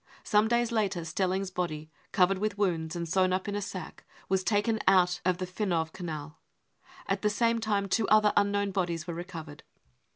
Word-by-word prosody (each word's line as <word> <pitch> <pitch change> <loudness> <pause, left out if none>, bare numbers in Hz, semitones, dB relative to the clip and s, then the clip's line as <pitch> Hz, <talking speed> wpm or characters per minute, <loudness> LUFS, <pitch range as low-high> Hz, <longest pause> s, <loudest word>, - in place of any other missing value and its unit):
Some 210 +1 +3
days 235 0 +1
later 200 -7 0
Stelling's 190 +3 -1
body, 155 -4 -4 0.2
covered 185 0 +3
with 210 -1 -1
wounds, 170 -5 0
and 170 -1 -3
sewn 185 +2 +2
up 185 +2 -1
in 205 - -2
a 205 - -2
sack, 185 -4 -7 0.3
was 190 0 +1
taken 220 +2 +1
out 180 -2 +4
of 185 0 +1
the 185 - -3
Finow 180 -3 -1
Canal. 155 -4 -6 0.7
At - - -1
the 210 - +2
same 230 +2 +1
time 205 -3 0
two 215 +2 +1
other 215 -1 +5
unknown 200 0 +2
bodies 175 -4 -1
were 170 - -4
recovered. 165 -4 -8
185 Hz, 185 wpm, -29 LUFS, 175-205 Hz, 0.7 s, other